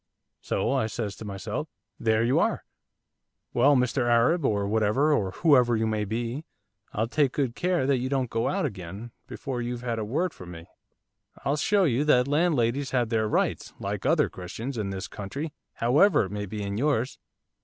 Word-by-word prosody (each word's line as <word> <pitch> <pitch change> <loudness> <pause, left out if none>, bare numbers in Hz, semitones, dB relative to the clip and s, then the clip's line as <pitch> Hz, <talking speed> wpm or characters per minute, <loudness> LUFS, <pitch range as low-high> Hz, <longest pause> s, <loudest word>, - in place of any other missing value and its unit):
'"So," - - -1
I 110 - +1
says 105 -2 -4
to 110 - -8
myself, 95 -2 -4 0.3
"there 110 -1 +2
you 120 +3 +3
are. - - +1 0.9
Well, 140 +4 +5
Mr 125 -1 +1
Arab, 125 +9 +3
or 100 -5 +1
whatever, 110 +8 +2
or 100 -9 +1
whoever, 125 - +4
you 110 - +1
may 110 -1 0
be, 120 +7 -3 0.5
I'll 110 - 0
take 140 +1 +1
good 135 -5 0
care 180 -6 +1
that 135 -1 +2
you 130 +1 -2
don't 135 -2 0
go 115 - 0
out 195 0 0
again 100 - -6 0.2
before 130 -3 -4
you've 120 0 -4
had 115 -2 -2
a - - -2
word 155 +11 -1
from 90 - -11
me. 85 -1 -9 0.8
I'll 140 - +2
show 195 +7 +2
you 140 -4 +2
that 125 -4 +4
landladies 140 -4 +1
have 125 -3 0
their 110 -2 +1
rights, - - -1
like - - -3
other - - +3
Christians, 110 +9 -6
in 105 -4 -2
this 95 +2 -4
country, 140 +11 -6 0.2
however 145 - +4
it 95 - -8
may 105 0 -4
be 105 +1 -5
in 100 0 -3
yours." 135 -3 0
120 Hz, 185 wpm, -27 LUFS, 105-140 Hz, 0.9 s, Well